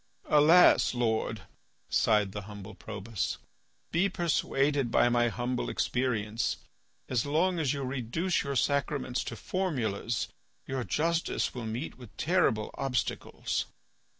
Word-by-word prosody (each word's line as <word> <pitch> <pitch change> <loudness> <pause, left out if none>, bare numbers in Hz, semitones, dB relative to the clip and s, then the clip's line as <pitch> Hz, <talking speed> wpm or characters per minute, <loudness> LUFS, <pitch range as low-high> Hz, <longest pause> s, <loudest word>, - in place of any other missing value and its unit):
"Alas! 155 -1 +6
Lord," 110 -3 0 0.4
sighed 105 -3 +2
the 105 - -5
humble 105 0 -9
Probus. 105 +1 -4 0.5
"Be 180 +4 +2
persuaded 145 -6 +1
by 120 - +4
my 120 0 +3
humble 120 +1 -2
experience; 115 -3 0 0.5
as 125 -3 +1
long 170 +5 +1
as 145 -5 +1
you 140 -1 -2
reduce 130 +8 -1
your 140 -1 -3
sacraments 140 -1 0
to 120 - -5
formulas 120 - -2 0.4
your 130 -1 -2
justice 165 - 0
will 120 -3 -5
meet 120 +6 -5
with 120 -4 -13
terrible 160 -12 +2
obstacles." 135 -3 -2
125 Hz, 120 wpm, -30 LUFS, 110-150 Hz, 0.5 s, Alas